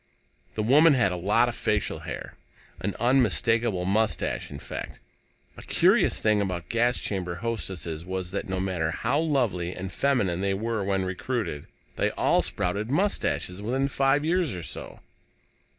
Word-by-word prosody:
The 110 - -1
woman 145 +6 +6
had 120 -7 +3
a - - -2
lot 105 +7 +3
of 120 - -3
facial - - -1
hair - - -7 0.5
an 95 +2 -3
unmistakable 115 -5 +2
mustache, 110 +3 0
in 70 - -7
fact. - - -7 0.6
A - - -9
curious - - +3
thing 105 -1 +2
about 90 -4 -3
gas 120 +1 +2
chamber 90 -3 -3
hostesses 90 -6 -3
was 95 0 -4
that, 100 -1 -4
no 95 0 -1
matter 90 -4 -1
how 125 - 0
lovely 120 - 0
and 95 0 -5
feminine 100 -11 +1
they 100 0 +1
were 110 0 -2
when 95 -1 0
recruited, 95 - -3 0.3
they - - +2
all - - +3
sprouted 100 +5 -2
mustaches 145 - 0
within 130 +6 0
five 135 +1 +2
years 170 - +1
or 90 - -6
so. - - -8
105 Hz, 155 wpm, -26 LUFS, 90-125 Hz, 0.6 s, woman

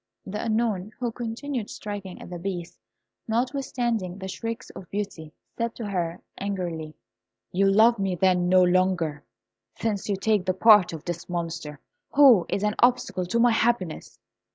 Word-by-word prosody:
The 210 +2 -4
Unknown, 220 -3 0
who 240 -2 -1
continued 240 +1 -4
striking 200 -3 -7
at - - -10
the 175 - -5
Beast, 175 -2 -5 0.5
notwithstanding 235 -5 -1
the 190 -1 -6
shrieks 230 +4 -5
of 180 - -11
Beauty, 195 -6 -5 0.2
said 230 0 -2
to 230 - -5
her, 175 -4 -2 0.2
angrily, 175 -6 -4 0.6
"You 195 +2 +3
love 220 +3 +5
me, 195 -2 0
then, 180 0 +2
no 185 0 +6
longer, 180 -5 +1 0.5
since 210 -3 -2
you 200 - +2
take 205 -1 +1
the 185 - +1
part 210 -3 +6
of 160 -2 -8
this 175 0 -5
Monster, 165 -4 -4 0.4
who 260 -11 +7
is 200 - -1
an 210 0 +1
obstacle 245 -7 +2
to 230 +6 0
my 240 0 +5
happiness!" 225 -7 0
195 Hz, 155 wpm, -25 LUFS, 180-230 Hz, 0.6 s, who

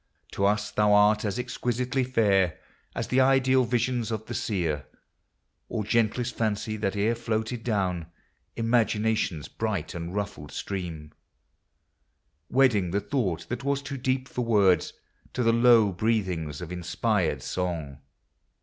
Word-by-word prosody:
To 100 - +1
us 105 +1 0
thou 105 -1 +3
art 105 +1 +5
as 105 +1 -2
exquisitely 125 +1 -1
fair 100 -8 +2 0.4
As - - -3
the 130 - +3
ideal 130 -1 +4
visions 120 -1 0
of 110 -1 -3
the - - -6
seer, 85 -8 -1 0.8
Or 110 - -2
gentlest 115 +3 0
fancy 110 0 -1
that 105 -1 -1
e'er 105 +3 +2
floated 115 0 -3
down 95 -7 -1 0.5
Imagination's 110 - +1
bright, 100 -8 -3
unruffled 85 -3 -5
stream, 85 -6 -5 1.4
Wedding 125 -9 +3
the 100 +4 0
thought 105 - -2
that 120 +3 -4
was 140 0 0
too 140 0 -5
deep 130 0 -1
for 125 - -4
words 100 -6 +3 0.4
To 125 - 0
the 115 0 +4
low 115 -3 +5
breathings 90 -7 -1
of 90 -1 -7
inspired 90 -2 -1
song. 80 -6 -3
110 Hz, 130 wpm, -27 LUFS, 95-120 Hz, 1.4 s, art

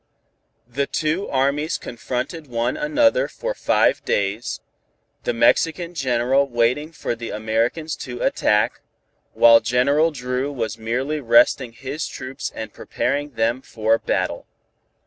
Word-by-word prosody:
The 140 +3 -2
two 160 +5 -1
armies 140 +4 0
confronted 125 +6 -5
one 120 0 -1
another 300 +8 +2
for - - -4
five - - +2
days, 100 +4 -1 0.6
General 115 -1 -1 1.0
Benevides - - -23
waiting 125 +7 +1
for 165 - -3
the 115 0 -6
Americans 115 +9 -1
to 125 -2 -6
attack, 105 -1 +1 0.5
while 115 0 +7
General 125 +8 +2
Dru 130 -1 -3
was 115 -5 -4
merely 130 +7 -2
resting 120 0 +3
his 135 +6 -5
troops 130 +1 -6
and 110 - -6
preparing 145 0 -2
them 115 +3 0
for 110 -2 0
battle. - - -2
125 Hz, 120 wpm, -22 LUFS, 115-150 Hz, 1.0 s, while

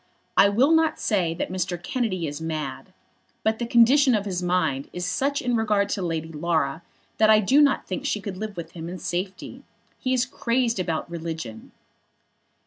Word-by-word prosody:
"I 200 - +6
will 250 +9 +3
not 320 -1 +3
say 175 -6 0
that 175 - -3
Mr. 180 -1 -2
Kennedy 185 -3 -2
is 145 +1 -5
mad; 155 -4 -4 0.5
but 220 0 +1
the 235 - -2
condition 250 +3 +5
of 205 -1 -1
his 185 -3 -2
mind 175 -7 0
is 180 0 -4
such 280 +9 0
in 245 -1 +1
regard 210 -3 +1
to 200 - -2
Lady 165 -2 -3
Laura 160 -1 -1 0.4
that 215 0 +5
I 215 0 +7
do 260 +8 +4
not 285 -2 +3
think 280 - -4
she 215 - 0
could 200 -1 -6
live 215 -1 -6
with 170 - -6
him 165 -1 -7
in 180 - -6
safety. 185 +2 -4 0.4
He 255 - -2
is 255 -1 +2
crazed 235 -3 0
about 165 -3 -2
religion." 160 -9 -6
190 Hz, 185 wpm, -24 LUFS, 165-235 Hz, 0.5 s, I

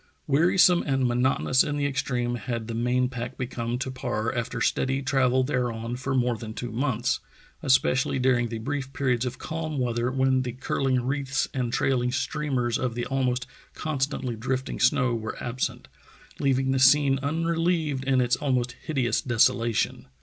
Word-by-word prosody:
Wearisome 175 +4 +4
and 135 -2 +2
monotonous 130 +1 +2
in 145 0 -2
the 145 - 0
extreme 125 -3 -1
had 115 0 -3
the 115 - -4
main 125 +2 +1
pack 125 0 -6
become 120 -1 -3
to 130 +1 -3
Parr 120 -4 -2
after 120 0 -3
steady 135 +4 0
travel 130 -1 +2
thereon 120 -3 -2
for 135 +2 -2
more 125 -2 +2
than 110 -1 -8
two 120 - -5
months, 125 +1 0 0.4
especially 135 -2 +2
during 125 -2 +2
the 115 - -4
brief 135 +3 -4
periods 130 -3 0
of 125 - -5
calm 160 -2 -4
weather 120 -1 0
when 130 0 +2
the 125 -2 -4
curling 130 0 0
wreaths 135 0 -1
and 125 -4 -1
trailing 125 0 +1
streamers 130 -2 -1
of 125 -3 -2
the 120 - -2
almost 125 -2 0 0.3
constantly 135 -4 -2
drifting 130 +4 -3
snow 125 -1 +3
were 110 -1 -4
absent, 120 +1 -3 0.5
leaving 135 -1 +1
the 135 - +1
scene 135 0 +5
unrelieved 165 -1 0
in 135 -1 +2
its 125 0 +2
almost 125 -4 0
hideous 130 -6 0
desolation. 115 -1 +1
130 Hz, 160 wpm, -26 LUFS, 120-135 Hz, 0.5 s, scene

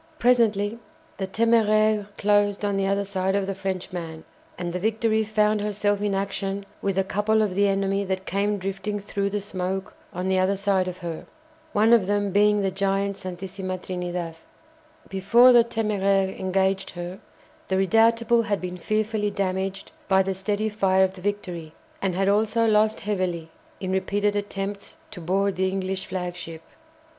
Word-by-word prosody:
Presently 230 -4 +2 0.4
the 190 - -3
"Téméraire" 215 -1 +3
closed 205 0 +2
on 200 -1 0
the 195 0 +1
other 200 +1 +1
side 190 -1 -1
of 200 -1 +1
the 195 - -2
Frenchman, 180 -4 -5 0.3
and 175 -1 -4
the 180 - -2
"Victory" 220 +2 +1
found 215 0 +1
herself 205 -1 0
in 205 -1 0
action 195 0 -3 0.2
with 195 -1 -1
a 195 - +3
couple 210 +3 +1
of 205 -3 -1
the 200 +2 +3
enemy 195 0 +1
that 190 0 -3
came 205 +2 0
drifting 195 +2 -3
through 200 0 -2
the 205 +1 -2
smoke 190 -1 -3 0.2
on 180 +1 -3
the 190 0 +2
other 190 +2 +2
side 195 -1 +1
of 180 0 -5
her, 165 -2 -5 0.4
one 220 +3 +4
of 215 -6 +4
them 205 -1 0
being 210 +1 +3
the 195 - +1
giant 195 +1 0
"Santisima 185 0 -5
Trinidad." 175 -2 -4 0.7
Before 235 +6 +5
the 240 -1 +7
"Téméraire" 200 -4 0
engaged 190 0 0
her, 175 +2 -6 0.5
the 190 - 0
"Redoutable" 230 +3 +3
had 205 -2 0
been 180 0 -5
fearfully 215 +2 -1
damaged 195 -1 -3 0.2
by 190 -1 +4
the 195 0 -1
steady 205 +3 -1
fire 190 -3 +2
of 190 0 +1
the 190 - -12
"Victory," 180 -5 -4 0.3
and 190 -2 0
had 195 +1 +1
also 215 +3 +2
lost 215 0 +3
heavily 180 -5 -2 0.3
in 185 -1 -3
repeated 205 +2 0
attempts 200 0 -4
to 180 - -8
board 190 +3 0
the 190 0 +2
English 190 0 -3
flagship. 175 -3 -5
195 Hz, 165 wpm, -25 LUFS, 190-210 Hz, 0.7 s, the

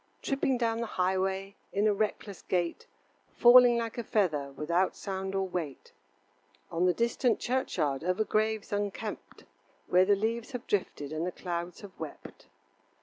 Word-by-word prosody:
Tripping 270 -1 +1
down 230 -1 0
the 235 - -2
highway 190 +1 0 0.2
In 205 +2 +1
a 215 - +4
reckless 205 -1 -3
gait, 175 -2 -2 0.5
Falling 245 0 +8
like 230 0 -3
a - - -2
feather 155 -11 0
Without 170 +6 0
sound 190 -1 -4
or 195 0 0
weight. 165 -7 -5 0.8
On 175 +2 +2
the 180 - +4
distant 235 0 +1
churchyard 155 - -1
Over 185 +4 +1
graves 215 -1 0
unkept, 205 +1 -4 0.4
Where 180 +1 +4
the 205 +1 +4
leaves 225 +5 -2
have 250 0 -5
drifted 155 -7 -2
And 155 +1 -2
the - - -2
clouds 175 -1 -5
have 205 - -10
wept. - - -9
195 Hz, 150 wpm, -30 LUFS, 180-225 Hz, 0.8 s, Falling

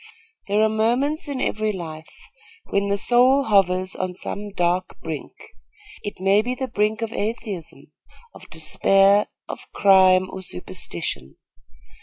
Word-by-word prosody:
There 205 +2 +2
are - - +5
moments 245 +9 0
in 280 -2 -4
every 215 -3 -1
life 160 -5 -8 0.6
when 200 0 +1
the 200 0 0
soul 250 +6 +4
hovers 185 -4 +2
on 185 -1 -4
some 205 +3 -5
dark 180 -1 -1
brink. 160 -3 -5 0.7
It 205 - -7
may 195 +2 +3
be 250 +3 -3
the 260 +1 -3
brink 215 0 0
of 225 0 -4
atheism, 210 -5 -5 0.4
of - - -15
despair, 195 +1 +3 0.2
of - - -9
crime, 185 -2 +5
or 190 - -7
superstition. 90 - -5
200 Hz, 135 wpm, -22 LUFS, 185-220 Hz, 0.7 s, are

